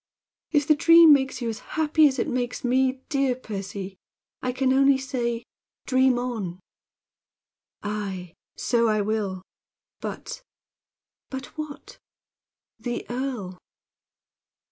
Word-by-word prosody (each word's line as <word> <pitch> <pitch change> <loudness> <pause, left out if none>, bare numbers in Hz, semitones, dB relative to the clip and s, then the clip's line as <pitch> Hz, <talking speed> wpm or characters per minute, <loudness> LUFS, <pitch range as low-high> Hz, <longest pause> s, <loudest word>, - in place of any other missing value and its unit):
"If 295 -2 +2
the 310 - +7
dream 330 +1 +8
makes 265 -2 +1
you 235 - -1
as 220 - -4 0.2
happy 310 0 +5
as 270 -1 -1
it - - 0
makes 245 -1 -2
me, 260 +1 +2
dear 275 -4 +1
Percy, 195 -4 -6 0.4
I 255 - -1
can 260 +1 +1
only 275 0 +5
say 240 -3 -2 0.4
dream 260 -1 +3
on." 220 -8 -3 1.2
"Aye! 195 -4 -4 0.2
So 235 -1 +2
I 215 -1 +2
will. 200 -3 -2 0.6
But - - -6 0.4
" - - -68
"But 265 0 -7
what?" 305 -2 -8 0.8
"The 240 -1 -4
earl!" 240 -8 -4
250 Hz, 120 wpm, -25 LUFS, 215-275 Hz, 1.2 s, dream